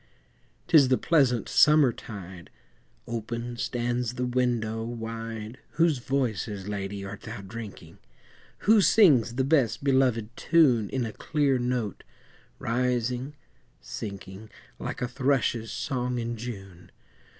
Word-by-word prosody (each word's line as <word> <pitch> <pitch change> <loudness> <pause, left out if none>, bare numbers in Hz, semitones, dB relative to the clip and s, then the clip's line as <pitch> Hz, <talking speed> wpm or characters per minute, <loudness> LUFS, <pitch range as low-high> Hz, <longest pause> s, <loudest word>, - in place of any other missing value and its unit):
'Tis 145 -5 +6
the 130 0 +3
pleasant 130 -8 +2
summertide, 120 - +2 0.6
Open 120 +1 -4
stands 120 0 -2
the 125 - -1
window 120 -3 0
wide 115 0 -6
Whose 160 -4 +2
voices, 110 -7 -2
Lady, 100 -1 -4
art 100 +1 -8
thou 110 -2 -7
drinking? 105 +1 -9 0.7
Who 215 0 +6
sings 150 - +5
the 130 - +1
best 135 -4 +2
belovèd 130 -5 +2
tune 130 -11 +3
In 130 -2 -1
a 110 - -5
clear 145 -4 0
note, 120 -4 -2 0.5
rising, 125 +3 -1 0.4
sinking, 100 0 -8 0.3
Like - - -4
a - - 0
thrush's 125 -4 0
song 125 0 -2
in 120 0 -3
June? 95 -7 -8
120 Hz, 115 wpm, -27 LUFS, 110-130 Hz, 0.7 s, Tis